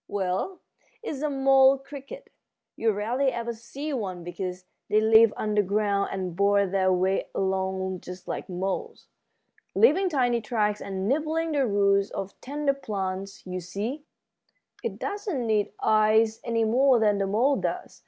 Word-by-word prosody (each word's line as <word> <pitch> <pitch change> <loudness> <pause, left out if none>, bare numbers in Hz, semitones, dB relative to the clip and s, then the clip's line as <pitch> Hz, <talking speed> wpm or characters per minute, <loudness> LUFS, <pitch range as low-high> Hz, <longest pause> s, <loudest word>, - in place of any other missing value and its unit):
"Well, 195 - -2 0.4
it's 290 -11 -5
a 300 - 0
mole 270 -1 +5
cricket. 285 - -11 0.4
You 225 -1 +1
rarely 240 +7 0
ever 235 -1 -3
see 265 +7 -6
one 190 -8 -4
because 180 +1 -5 0.2
they 215 - +4
live 220 0 +6
underground 205 -1 +1
and 185 -3 -4
bore 200 +1 +3
their 190 0 +1
way 185 +1 +1
along 190 -1 -1
just 180 +1 -10
like - - -5
moles, 185 +1 -4 0.7
leaving 385 -3 +4
tiny 245 -6 +1
tracks 210 -2 -1
and 195 0 -3
nibbling 315 +5 0
the 280 -4 +1
roots 200 -1 +2
of 195 0 -5
tender 285 +1 -1
plants. 195 -6 -5
You 185 0 -4
see, 210 - -5 0.8
it - - -3
doesn't 400 - -3
need 215 -2 +1
eyes 220 +1 +3
any 230 -1 0
more 250 +4 +4
than 210 -3 +2
the 195 - 0
mole 245 +8 +2
does. - - -4
215 Hz, 145 wpm, -26 LUFS, 195-270 Hz, 0.8 s, live